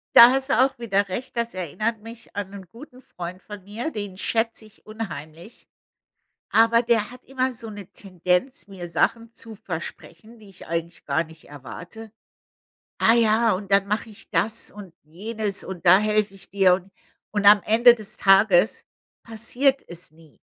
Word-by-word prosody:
Da 235 Hz, +2 st, +11 dB
hast 270 Hz, +1 st, -1 dB
du 245 Hz, -, +2 dB
auch 270 Hz, -, -5 dB
wieder 200 Hz, -4 st, 0 dB
Recht. 245 Hz, +8 st, -6 dB
Das 235 Hz, 0 st, -2 dB
erinnert 215 Hz, +6 st, -3 dB
mich 225 Hz, 0 st, -13 dB
an 200 Hz, -1 st, -4 dB
'nen 200 Hz, -1 st, -10 dB
guten 255 Hz, +1 st, -14 dB
Freund 180 Hz, -7 st, -8 dB
von 205 Hz, -1 st, -10 dB
mir, 220 Hz, +10 st, -5 dB
den 205 Hz, -5 st, -6 dB
schätz 225 Hz, +3 st, -1 dB
ich 215 Hz, 0 st, -19 dB
unheimlich. 175 Hz, -4 st, -9 dB, 0.8 s
Aber 230 Hz, +1 st, +5 dB
der 230 Hz, -3 st, +1 dB
hat 250 Hz, 0 st, -14 dB
immer 260 Hz, -1 st, -1 dB
so 230 Hz, -1 st, -9 dB
'ne 205 Hz, -3 st, -9 dB
Tendenz, 185 Hz, -, -2 dB
mir 185 Hz, -3 st, -8 dB
Sachen 230 Hz, +7 st, 0 dB
zu 225 Hz, -1 st, -12 dB
versprechen, 195 Hz, +2 st, -8 dB
die 210 Hz, -2 st, -16 dB
ich 190 Hz, -, -14 dB
eigentlich 170 Hz, +1 st, -4 dB
gar 145 Hz, +3 st, +1 dB
nicht 160 Hz, 0 st, -15 dB
erwarte. 175 Hz, -, -10 dB, 0.9 s
„Ah, 225 Hz, -, +5 dB
ja, 225 Hz, 0 st, +3 dB
und 195 Hz, +1 st, -6 dB
dann 195 Hz, 0 st, +4 dB
mach 210 Hz, +3 st, -1 dB
ich 220 Hz, 0 st, -13 dB
das 220 Hz, +2 st, -1 dB
und 195 Hz, -4 st, -12 dB
jenes 205 Hz, +6 st, -5 dB
und 185 Hz, -2 st, -8 dB
da 180 Hz, +2 st, +8 dB
helfe 210 Hz, -1 st, 0 dB
ich 195 Hz, -, -13 dB
dir“, 190 Hz, -2 st, +4 dB
und 190 Hz, +1 st, -4 dB, 0.4 s
und 205 Hz, -1 st, -1 dB
am 205 Hz, 0 st, +8 dB
Ende 235 Hz, +2 st, +6 dB
des 215 Hz, -3 st, -10 dB
Tages 195 Hz, 0 st, +4 dB, 0.4 s
passiert 245 Hz, +5 st, 0 dB
es 175 Hz, +1 st, -11 dB
nie. 160 Hz, -2 st, -21 dB
210 Hz, 175 wpm, -23 LUFS, 185-230 Hz, 0.9 s, Da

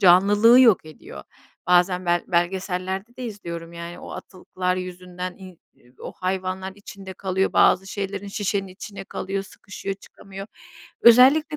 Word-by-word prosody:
canlılığı 205 Hz, +6 st, +6 dB
yok 225 Hz, -10 st, +5 dB
ediyor. 155 Hz, -, -11 dB, 0.4 s
Bazen 180 Hz, 0 st, +3 dB
ben, 175 Hz, 0 st, +1 dB
belgesellerde 190 Hz, +4 st, -2 dB
de 255 Hz, -, -6 dB
izliyorum, 170 Hz, -6 st, -7 dB
yani, 170 Hz, +1 st, -8 dB
o -, -, -10 dB
atıklar 185 Hz, 0 st, -4 dB
yüzünden 180 Hz, 0 st, -6 dB
i 185 Hz, -3 st, -12 dB, 0.2 s
e 125 Hz, -, -23 dB
o -, -, -7 dB
hayvanlar 185 Hz, 0 st, -3 dB
içinde 195 Hz, -2 st, -10 dB
kalıyor 190 Hz, 0 st, -1 dB
bazı 190 Hz, +1 st, +4 dB
şeylerin. 200 Hz, 0 st, -4 dB
Şişenin 200 Hz, -1 st, -2 dB
içinde 195 Hz, +1 st, -9 dB
kalıyor, 195 Hz, +1 st, -4 dB
sıkışıyor, 195 Hz, 0 st, -7 dB
çıkamıyor. 195 Hz, 0 st, -11 dB, 0.5 s
Özellikle 270 Hz, +6 st, +6 dB
190 Hz, 135 wpm, -23 LUFS, 180-200 Hz, 0.5 s, canlılığı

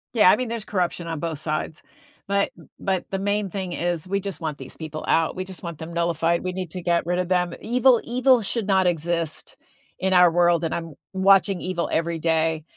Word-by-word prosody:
Yeah. 210 Hz, -4 st, +7 dB
I -, -, +4 dB
mean, 255 Hz, -2 st, -2 dB
there's 230 Hz, -2 st, -4 dB
corruption 175 Hz, -4 st, -2 dB
on 165 Hz, -2 st, -3 dB
both 160 Hz, -2 st, -3 dB
sides, 155 Hz, 0 st, -3 dB, 0.4 s
but 200 Hz, 0 st, +1 dB, 0.3 s
but 190 Hz, -2 st, -1 dB
the 195 Hz, -, -1 dB
main 205 Hz, 0 st, 0 dB
thing 185 Hz, -1 st, -4 dB
is 175 Hz, 0 st, -2 dB
we 200 Hz, +1 st, -1 dB
just 195 Hz, -2 st, -5 dB
want 155 Hz, -3 st, -4 dB
these -, -, -8 dB
people 155 Hz, -1 st, -6 dB
out. 165 Hz, +2 st, +2 dB
We 185 Hz, -, -3 dB
just 190 Hz, -1 st, -9 dB
want 170 Hz, -4 st, -6 dB
them 160 Hz, +2 st, -8 dB
nullified. 170 Hz, 0 st, +1 dB
We 185 Hz, 0 st, -3 dB
need 185 Hz, -3 st, -5 dB
to 180 Hz, -, -5 dB
get 170 Hz, -1 st, +1 dB
rid 180 Hz, +1 st, 0 dB
of 180 Hz, -, -1 dB
them. 180 Hz, -2 st, +1 dB
Evil 245 Hz, +1 st, +4 dB
evil 250 Hz, 0 st, +3 dB
should 215 Hz, +1 st, -2 dB
not 190 Hz, -2 st, +3 dB
exist 170 Hz, -1 st, -2 dB, 0.4 s
in 190 Hz, 0 st, +1 dB
our 180 Hz, -2 st, +7 dB
world, 175 Hz, -1 st, +3 dB
and 165 Hz, -, -1 dB
I'm 165 Hz, -2 st, -4 dB, 0.2 s
watching 195 Hz, 0 st, +4 dB
evil 180 Hz, -2 st, -2 dB
every 165 Hz, +1 st, 0 dB
day. 160 Hz, -1 st, +1 dB
175 Hz, 215 wpm, -24 LUFS, 165-195 Hz, 0.4 s, Yeah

